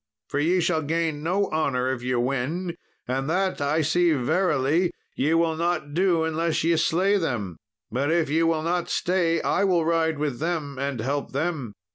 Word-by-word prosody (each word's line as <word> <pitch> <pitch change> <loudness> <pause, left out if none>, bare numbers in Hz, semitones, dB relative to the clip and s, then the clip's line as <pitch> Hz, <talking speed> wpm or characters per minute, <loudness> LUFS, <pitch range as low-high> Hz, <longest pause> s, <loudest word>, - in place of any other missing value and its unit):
For 145 - -1
ye 175 +5 +2
shall 170 -1 +1
gain 160 0 -1
no 185 +6 +1
honour 130 -5 0
if 120 - -6
ye 125 +1 -1
win, 140 +8 -1 0.3
and 135 +3 -2
that 185 -1 0
I 145 +3 +1
see 170 +2 +3
verily 155 +3 +1 0.3
ye 150 +5 +1
will 165 -1 +2
not 165 -3 -1
do 175 -1 +2
unless 160 0 0
ye 165 +1 +3
slay 185 +5 +2
them; 110 - -3 0.3
but 135 +6 0
if 170 -1 +2
ye 155 +4 +1
will 165 -1 +1
not 175 +1 -1
stay, 170 -2 +1
I 200 - +1
will 180 -4 +2
ride 165 -1 +1
with 145 -4 -2
them 155 -4 -3
and 140 -3 -2
help 140 +4 -2
them." 140 -7 -2
160 Hz, 180 wpm, -25 LUFS, 140-170 Hz, 0.3 s, see